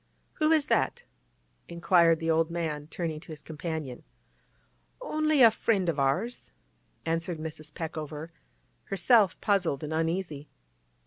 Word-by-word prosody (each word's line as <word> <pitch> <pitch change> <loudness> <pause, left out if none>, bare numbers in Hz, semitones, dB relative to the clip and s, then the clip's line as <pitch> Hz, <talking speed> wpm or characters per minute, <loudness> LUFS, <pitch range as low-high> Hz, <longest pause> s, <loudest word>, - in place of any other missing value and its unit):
'Who 310 0 +3
is 310 -3 +4
that?' 485 - 0 0.6
inquired 170 -1 +3
the 165 0 0
old 160 0 +2
man, 160 -3 -3
turning 160 -2 -4
to 170 +1 -13
his 150 -1 -9
companion. 155 -5 -5 1.0
'Only 310 - +2
a 230 - +9
friend 200 -4 0
of 155 -4 -1
ours,' 140 - -1 0.6
answered 165 +1 -1
Mrs. 155 -1 -7
Peckover, 155 0 -6 0.5
herself 200 +2 +3
puzzled 185 -9 +1
and 150 +1 -4
uneasy. 165 -2 -2
165 Hz, 125 wpm, -28 LUFS, 155-195 Hz, 1.0 s, a